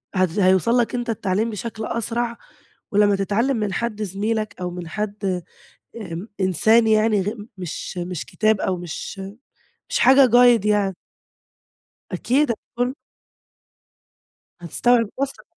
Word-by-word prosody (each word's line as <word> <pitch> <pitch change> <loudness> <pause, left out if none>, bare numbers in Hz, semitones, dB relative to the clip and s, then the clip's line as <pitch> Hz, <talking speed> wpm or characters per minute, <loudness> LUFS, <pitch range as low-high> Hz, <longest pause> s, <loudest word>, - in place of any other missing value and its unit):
هد 185 +1 +1
هيوصّل 190 +6 +4
لك 240 +1 +1
أنت 240 -1 -3
التعليم 210 +1 0
بشكل 220 +1 -5
أسرع 235 +1 -2 0.5
ولمّا 205 0 +4
تتعلّم 225 +7 0
من 210 -3 -2
حد 215 0 -2
زميلك 215 +3 -2
أو 180 0 -3
من 175 -1 -7
حد 200 -2 -3 0.5
امم، 215 -4 -6
إن 180 +7 -6 0.2
إنسان 220 +6 +4
يعني 215 -2 +3
غ 205 - -1 0.3
مش 180 +1 -6
مش 175 -1 -4
كتاب 215 -1 +1
أو 185 - 0
مش 175 +3 -7 0.7
مش - - 0
حاجة 265 +1 +7
guide 240 -3 +6
يعني 205 -3 +2 1.2
أكيد 270 +1 +1
هتكون 245 +3 -3 1.7
هتستوعب 230 +6 +2
أسرع. 275 0 -3
215 Hz, 125 wpm, -22 LUFS, 190-235 Hz, 1.7 s, حاجة